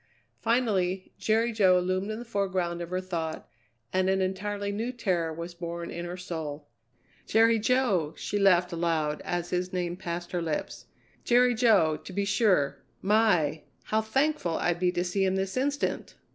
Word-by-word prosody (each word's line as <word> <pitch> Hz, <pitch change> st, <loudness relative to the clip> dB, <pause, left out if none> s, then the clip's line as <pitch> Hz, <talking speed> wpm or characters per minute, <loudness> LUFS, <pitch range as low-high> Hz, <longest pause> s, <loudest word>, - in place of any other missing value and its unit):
Finally 200 Hz, -6 st, 0 dB
Jerry 225 Hz, +2 st, +2 dB
Jo 190 Hz, -5 st, +4 dB
loomed 185 Hz, +3 st, -1 dB
in 215 Hz, -, -3 dB
the 240 Hz, -, -7 dB
foreground 185 Hz, -5 st, -1 dB
of 170 Hz, -, -5 dB
her 185 Hz, +1 st, -1 dB
thought 165 Hz, -4 st, -4 dB, 0.5 s
and 185 Hz, 0 st, +2 dB
an 190 Hz, 0 st, +2 dB
entirely 200 Hz, +2 st, -2 dB
new 225 Hz, +5 st, -2 dB
terror 180 Hz, -9 st, -1 dB
was 170 Hz, +2 st, -6 dB
born 170 Hz, 0 st, -5 dB
in 170 Hz, 0 st, -5 dB
her 175 Hz, +1 st, -5 dB
soul. 155 Hz, -5 st, -6 dB, 0.6 s
"Jerry 225 Hz, +1 st, +4 dB
Jo!" 210 Hz, -, +1 dB
she 205 Hz, -, -2 dB
laughed 180 Hz, -2 st, +4 dB
aloud 160 Hz, -3 st, 0 dB
as 175 Hz, 0 st, -3 dB
his 180 Hz, 0 st, -1 dB
name 175 Hz, -2 st, -2 dB
passed 175 Hz, -1 st, -5 dB
her 175 Hz, -, -1 dB
lips. 160 Hz, -2 st, -4 dB, 0.4 s
"Jerry 245 Hz, 0 st, +4 dB
Jo, 210 Hz, -10 st, +4 dB
to 170 Hz, +5 st, -11 dB
be 200 Hz, +1 st, 0 dB
sure. 200 Hz, -, +2 dB, 0.2 s
My! 185 Hz, -8 st, +3 dB, 0.2 s
how 220 Hz, 0 st, +1 dB
thankful 220 Hz, -, 0 dB
I'd 175 Hz, -1 st, 0 dB
be 180 Hz, 0 st, +2 dB
to 175 Hz, 0 st, -1 dB
see 185 Hz, +2 st, 0 dB
him 190 Hz, 0 st, +1 dB
this 190 Hz, 0 st, -2 dB
instant!" 285 Hz, +3 st, -1 dB
185 Hz, 170 wpm, -28 LUFS, 170-215 Hz, 0.6 s, Jo